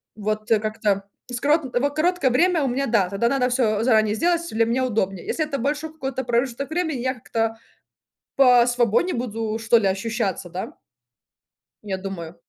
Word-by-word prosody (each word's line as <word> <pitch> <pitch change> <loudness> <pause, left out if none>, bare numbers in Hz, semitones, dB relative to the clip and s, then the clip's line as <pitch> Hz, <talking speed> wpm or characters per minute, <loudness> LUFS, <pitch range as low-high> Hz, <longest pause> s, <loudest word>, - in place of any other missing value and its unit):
Вот 215 +1 -3
как-то 215 -2 +1 0.3
с 245 - -3
коротком, 295 -2 +2
с - - +2
вот 285 +2 -1
короткое 345 -2 +2
время 335 +5 +3
у - - +1
меня, 265 +2 -1
да, 205 -8 +2
тогда 200 +4 0
надо 255 -1 +1
всё 225 -4 +1
заранее 220 -3 +3
сделать, 340 +6 +1
если 230 -9 0
мне 235 +3 0
удобнее. 195 -7 -1
Если 315 - -1
это 300 -2 -3
большой 295 +4 -2
какой-то 270 -4 -4
промежуток 245 +3 -1
времени, 320 -4 -1
я 260 +1 0
как-то 225 -1 -2 0.8
посвободнее 245 - +4
буду 225 -2 -3
что 225 +1 +4
ли 205 -4 +2
ощущаться, 195 -2 -2
да. 200 - -6 1.1
Я 190 -2 -3
думаю. 175 -4 -6
240 Hz, 170 wpm, -23 LUFS, 215-275 Hz, 1.1 s, посвободнее